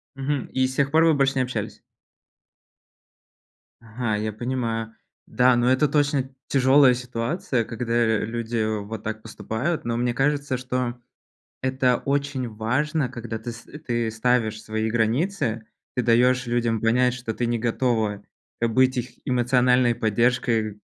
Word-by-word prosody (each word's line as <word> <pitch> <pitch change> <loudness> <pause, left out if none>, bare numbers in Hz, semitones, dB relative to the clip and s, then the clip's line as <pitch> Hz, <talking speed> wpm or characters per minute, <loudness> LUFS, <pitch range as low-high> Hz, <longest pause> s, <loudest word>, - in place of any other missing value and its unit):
Мгм. 135 0 -2
И 130 0 +2
с 130 - -7
тех 140 0 +1
пор 160 +2 +5
вы 165 - +5
больше 135 -2 +2
не 130 - +2
общались? 125 0 -5 2.0
Ага, 115 -1 -3
я 110 +1 -2
понимаю. 115 -1 -3 0.3
Да, 125 0 +3
но 120 0 +2
это 130 +3 +3
точно 145 -3 +1 0.2
тяжёлая 135 0 +5
ситуация, 125 +2 -2
когда, 115 0 -4
э, 115 -3 +2
люди 115 0 -2 0.2
вот 105 +1 -7
так 110 0 -4
поступают. 145 +10 -3
Но 115 0 -1
мне 120 0 0
кажется, 140 0 0
что 125 -1 -3 0.6
это 130 -1 +2
очень 140 -2 -1
важно, 125 +7 -1
когда 120 -2 -6
ты 120 +2 -6
ст 115 +1 -13 0.2
ты 120 -2 0
ставишь 110 -1 0
свои 110 +1 -2
границы. 115 - 0 0.3
Ты 125 - 0
даёшь 125 +2 +3
людям 120 -2 0
понять, 125 +2 +2
что 125 -2 -4
ты 120 +2 -2
не 120 0 0
готова, 115 -3 0 0.4
э, 115 - +2
быть 130 +3 +3
их 125 0 -3
эмоциональной 125 -1 +3
поддержкой. 115 -1 0
120 Hz, 145 wpm, -24 LUFS, 115-130 Hz, 2.0 s, пор